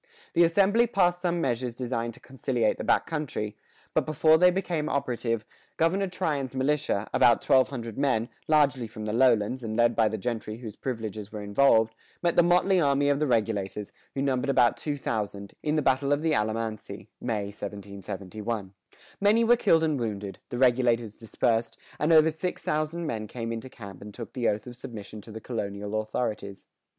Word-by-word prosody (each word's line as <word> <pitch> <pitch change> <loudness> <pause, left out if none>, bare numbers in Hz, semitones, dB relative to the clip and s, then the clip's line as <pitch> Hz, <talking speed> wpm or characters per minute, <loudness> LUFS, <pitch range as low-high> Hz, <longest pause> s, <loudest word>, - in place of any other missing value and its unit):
The 175 - +5
assembly 200 +7 +4
passed 180 -4 +2
some 175 -1 0
measures 125 -3 -1
designed 120 -2 -3
to - - -15
conciliate 130 -4 -1
the - - -3
back - - +2
country; 140 -9 -3 0.4
but - - +2
before 155 +1 +4
they 180 +1 +7
became 175 -4 -1
operative, 115 -5 -1 0.3
Governor 190 +5 +2
Tryon's 150 -8 -2
militia, 130 -6 0
about 120 -2 +5
twelve 130 -1 +4
hundred 115 -4 -6
men, 130 -5 +1 0.2
largely 140 -6 +3
from 110 -1 -8
the 105 - -2
lowlands, 120 0 +3
and 110 -1 -3
led 120 0 +4
by 110 - +4
the 110 - -3
gentry 110 0 -4
whose 115 -4 -8
privileges 110 -5 -5
were 105 -1 -6
involved, 110 +1 +4 0.3
met 170 -1 +2
the - - +7
motley 180 +2 +3
army 140 -1 +3
of 140 0 +2
the 150 - +1
Regulators, 105 -4 -1 0.2
who 135 - -1
numbered 135 0 0
about 125 -3 +4
two 145 -2 -3
thousand, 105 -5 -4
in 150 0 0
the 155 - +1
battle 135 +1 +2
of 145 +2 +1
the 160 -1 +2
Alamance 110 -1 -2
(May, 110 -4 -4
1771). 100 +1 -6 0.5
Many 210 +3 +4
were 235 +1 +6
killed 165 -9 +3
and 155 -4 +1
wounded, 105 -4 -4
the 120 - -4
Regulators 120 -3 +2
dispersed, 115 0 0 0.2
and 150 +2 +2
over 160 0 +6
six 180 +4 -4
thousand 155 +3 -1
men 110 -8 -3
came 115 +1 -5
into 115 +3 -5
camp 100 -7 -11
and 105 +1 -9
took 115 0 -9
the 120 -3 +1
oath 105 0 -2
of 125 -1 -9
submission 110 -3 -8
to 110 - -12
the 110 - -7
colonial 105 -2 -3
authorities. 110 -3 -4
120 Hz, 180 wpm, -27 LUFS, 110-150 Hz, 0.5 s, they